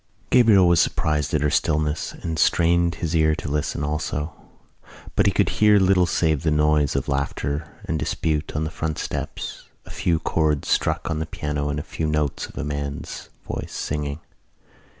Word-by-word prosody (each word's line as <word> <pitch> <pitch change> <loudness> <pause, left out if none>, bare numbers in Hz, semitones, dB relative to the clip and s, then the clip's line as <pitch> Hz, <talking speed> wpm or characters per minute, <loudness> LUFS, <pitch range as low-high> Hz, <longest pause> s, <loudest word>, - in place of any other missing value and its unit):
Gabriel 110 -7 +6
was 85 -1 +4
surprised 75 -2 0
at 75 - +1
her 75 - +2
stillness 75 -1 0
and 80 -2 -2
strained 85 0 +3
his 85 0 -2
ear 80 -1 +3
to 80 - -6
listen 75 0 -1
also. 75 +1 -2 0.8
But - - +3
he - - +4
could - - +2
hear 105 -1 +4
little 95 -2 +4
save 80 -3 +1
the 80 - +1
noise 75 -2 +2
of 70 - -1
laughter 70 +2 -2 0.2
and 80 0 -1
dispute 80 0 -1
on 75 - 0
the 80 - -3
front 80 -1 -3
steps, 70 +1 -5 0.2
a - - -11
few 85 -2 +1
chords 80 -2 0
struck - - +1
on 80 - -1
the 80 - -3
piano 75 -2 -3
and 75 0 -2
a - - -5
few 80 - -3
notes 75 -2 -1
of - - -15
a - - -2
man's 70 -1 -5 0.2
voice - - -5
singing. 75 0 -3
75 Hz, 180 wpm, -23 LUFS, 75-80 Hz, 0.8 s, Gabriel